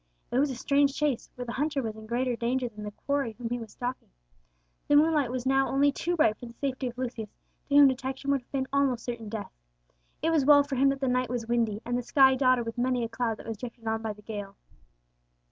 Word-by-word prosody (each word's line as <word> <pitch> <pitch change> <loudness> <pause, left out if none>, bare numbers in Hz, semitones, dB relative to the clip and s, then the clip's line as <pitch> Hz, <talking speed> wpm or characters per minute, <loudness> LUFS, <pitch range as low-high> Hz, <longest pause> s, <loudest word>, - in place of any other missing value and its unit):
It 245 - +2
was 285 +1 +3
a 260 - -4
strange 280 +2 +2
chase, 295 -5 -1
where 250 - -5
the 235 - -5
hunter 290 +3 -1
was 220 -2 -4
in 220 0 -11
greater 245 +2 0
danger 245 +2 -1
than 210 -2 -9
the 210 - -4
quarry 275 +2 -2
whom 230 +1 -6
he 245 - -1
was 225 -2 -9
stalking! 250 +1 -5 0.8
The 290 - +4
moonlight 300 -3 +4
was 250 0 -4
now 270 0 +3
only 280 +1 +3
too 350 +5 -2
bright 225 -10 +3
for 245 - -8
the 235 - -11
safety 265 -1 -2
of 245 0 -7
Lucius, 235 -4 -4 0.4
to 280 - +1
whom 285 -1 +9
detection 265 +1 -2
would 275 -2 +1
have 245 - -36
been 265 -1 -1
almost 275 -4 +1
certain 230 -3 -5
death. 215 -1 -5 0.7
It 325 - +2
was 315 -4 +3
well 285 +1 +7
for 280 -1 -4
him 270 +2 +4
that 275 0 -2
the 265 - +1
night 250 -1 +1
was 240 -2 -3
windy, 225 -3 0
and 245 - -1
the 245 - 0
sky 265 +2 +5
dotted 255 -2 +3
with 230 +1 -5
many 250 -1 +1
a 230 - -3
cloud 230 -2 -2
that - - -12
was 225 -2 -4
drifted 235 0 -9
on 220 0 -1
by 220 -1 -3
the 210 0 -17
gale. 205 -2 -6
250 Hz, 250 wpm, -28 LUFS, 230-275 Hz, 0.8 s, whom